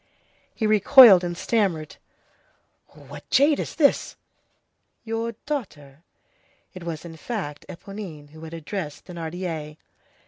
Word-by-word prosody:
He 220 Hz, -, -2 dB
recoiled 215 Hz, -2 st, +8 dB
and 175 Hz, -1 st, -4 dB
stammered:— 185 Hz, -9 st, -1 dB, 0.9 s
"What -, -, -14 dB
jade 285 Hz, +2 st, +4 dB
is -, -, -5 dB
this?" 290 Hz, -3 st, +2 dB, 0.9 s
"Your 225 Hz, +1 st, -3 dB
daughter." 155 Hz, -, -6 dB, 0.7 s
It 185 Hz, -2 st, -10 dB
was, 165 Hz, -1 st, -6 dB
in 165 Hz, -1 st, -10 dB
fact, 155 Hz, -7 st, -6 dB
Éponine, 175 Hz, -5 st, -9 dB
who 155 Hz, 0 st, -14 dB
had 160 Hz, 0 st, -9 dB
addressed 160 Hz, -1 st, -6 dB
Thénardier. 165 Hz, -3 st, -6 dB
180 Hz, 110 wpm, -24 LUFS, 155-220 Hz, 0.9 s, recoiled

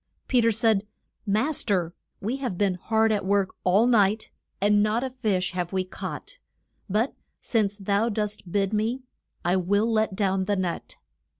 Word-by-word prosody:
Pe 250 Hz, -2 st, +3 dB
ter 230 Hz, -, +4 dB
said, 220 Hz, -2 st, +2 dB, 0.4 s
Mas 240 Hz, +10 st, +1 dB
ter, 180 Hz, -6 st, 0 dB, 0.3 s
we 230 Hz, +7 st, -2 dB
have 250 Hz, -10 st, -3 dB
been 200 Hz, -1 st, +2 dB
hard 220 Hz, +4 st, +1 dB
at 205 Hz, -2 st, 0 dB
work 195 Hz, 0 st, +1 dB
all 195 Hz, +5 st, +4 dB
the 250 Hz, -, +3 dB
night, 215 Hz, -1 st, +2 dB, 0.3 s
and 205 Hz, +1 st, +4 dB
not 215 Hz, +4 st, +1 dB
a 260 Hz, -, -3 dB
fish 210 Hz, -8 st, 0 dB
have 180 Hz, -1 st, -3 dB
we 190 Hz, -1 st, 0 dB
caught; 190 Hz, -, -7 dB, 0.5 s
but, 215 Hz, +7 st, +1 dB, 0.3 s
since 210 Hz, -4 st, 0 dB
thou 205 Hz, +3 st, +1 dB
dost 210 Hz, -4 st, -3 dB
bid 200 Hz, +1 st, +1 dB
me, 225 Hz, +5 st, 0 dB, 0.4 s
I 180 Hz, +2 st, +3 dB
will 205 Hz, +5 st, +1 dB
let 215 Hz, -3 st, +1 dB
down 190 Hz, -1 st, +1 dB
the 205 Hz, +1 st, +1 dB
net. 185 Hz, -3 st, -3 dB
205 Hz, 175 wpm, -26 LUFS, 190-225 Hz, 0.5 s, ter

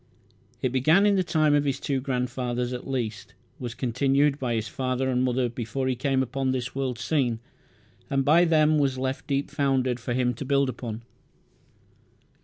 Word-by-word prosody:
It 130 Hz, -, +2 dB
began 155 Hz, +10 st, +4 dB
in 205 Hz, -1 st, +4 dB
the 190 Hz, -, +2 dB
time 155 Hz, -4 st, +2 dB
of 145 Hz, -1 st, +3 dB
his 135 Hz, -1 st, -1 dB
two 135 Hz, -2 st, -1 dB
grandfathers 125 Hz, -1 st, -2 dB
at 125 Hz, -, -6 dB
least, 115 Hz, -6 st, -4 dB, 0.2 s
was 120 Hz, -2 st, -5 dB
continued 135 Hz, +3 st, +1 dB
by 120 Hz, -3 st, -1 dB
his 110 Hz, 0 st, -2 dB
father 130 Hz, +2 st, -1 dB
and 125 Hz, 0 st, +1 dB
mother 125 Hz, 0 st, +1 dB
before 120 Hz, +3 st, -3 dB
he 130 Hz, -, +1 dB
came 130 Hz, +1 st, +1 dB
upon 130 Hz, +1 st, -2 dB
this 130 Hz, 0 st, -2 dB
world's 130 Hz, -3 st, -3 dB
scene, 130 Hz, -7 st, +1 dB, 0.7 s
and 135 Hz, -1 st, +1 dB
by 165 Hz, +4 st, +5 dB
them 155 Hz, -2 st, +4 dB
was 135 Hz, -2 st, +1 dB
left 130 Hz, +1 st, -3 dB
deep 140 Hz, 0 st, -1 dB
founded 130 Hz, -4 st, +1 dB
for 120 Hz, +1 st, -3 dB
him 125 Hz, -1 st, +1 dB
to 120 Hz, -, -6 dB
build 140 Hz, 0 st, +2 dB
upon. 115 Hz, -3 st, -6 dB
130 Hz, 180 wpm, -26 LUFS, 125-140 Hz, 0.7 s, by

